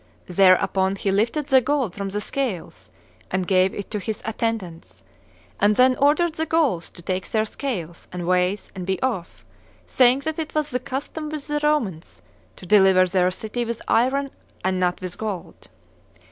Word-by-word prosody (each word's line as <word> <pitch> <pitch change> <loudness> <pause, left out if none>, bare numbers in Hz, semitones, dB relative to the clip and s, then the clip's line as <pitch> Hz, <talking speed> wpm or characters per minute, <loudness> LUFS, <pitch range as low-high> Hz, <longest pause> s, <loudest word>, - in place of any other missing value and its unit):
Thereupon 190 +1 +3
he 195 0 -1
lifted 230 +9 +1
the 265 -2 +5
gold 260 -6 0
from 200 0 -4
the 205 +2 -3
scales 185 - -4 0.4
and 185 0 -1
gave 185 0 +3
it 200 - -7
to 210 - -2
his 215 +2 -5
attendants, 185 - -4 0.6
and 205 +1 +4
then 255 +2 +5
ordered 305 +4 +3
the 320 0 -2
Gauls 295 - +1
to 175 - -14
take 185 +1 -3
their 220 -1 +1
scales 185 - -5
and 180 -1 -5
weights 180 +2 0
and 185 -2 -7
be 190 -1 0
off, 225 -10 -3 0.4
saying 255 +1 +4
that 315 +2 -3
it 315 -1 -5
was 305 -1 0
the 250 - 0
custom 280 +4 -5
with 305 -2 -5
the 295 0 -1
Romans 235 - -1 0.3
to - - -12
deliver 190 -2 +5
their 180 0 +2
city 220 +6 -4
with 235 -1 -4
iron 270 +4 +2 0.3
and 185 -1 +1
not. 180 -1 0
with 185 -1 -6
gold. 205 -6 -6
210 Hz, 175 wpm, -23 LUFS, 185-265 Hz, 0.6 s, the